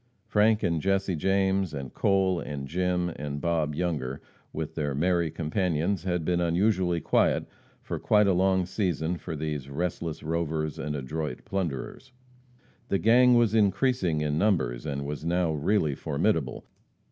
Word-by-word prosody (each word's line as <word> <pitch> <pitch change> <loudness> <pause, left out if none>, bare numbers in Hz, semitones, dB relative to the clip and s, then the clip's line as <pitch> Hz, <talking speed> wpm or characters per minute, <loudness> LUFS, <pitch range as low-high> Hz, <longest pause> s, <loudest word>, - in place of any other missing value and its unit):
Frank 110 +1 +3
and 85 -4 +1
Jesse 95 -1 +1
James, 95 0 +1
and 70 -3 -6
Cole, 95 -2 +2
and 70 -3 -5
Jim, 90 +2 0
and 75 0 -4
Bob 80 -2 0
Younger, 75 -6 -2 0.3
with 80 0 -4
their 75 -4 -2
merry 85 +2 +1
companions, 85 +2 -1
had 90 -3 -1
been 90 0 +1
unusually 90 0 +1
quiet - - +2 0.4
for - - -4
quite 105 -1 +4
a 100 - +3
long 95 0 +2
season 90 -3 -1
for 80 - -6
these 75 -3 -4
restless 80 +1 -3
rovers 80 -1 -2
and 75 0 -3
adroit 75 0 -4
plunderers. 95 - -4 0.7
The 100 - +1
gang 125 +4 +5
was 115 -3 +3
increasing 100 - +2
in 75 0 0
numbers, 80 - +1
and 70 -1 -3
was 75 +1 -5
now 85 0 +1
really 75 0 +1
formidable. 75 0 -1
85 Hz, 145 wpm, -27 LUFS, 75-95 Hz, 0.7 s, gang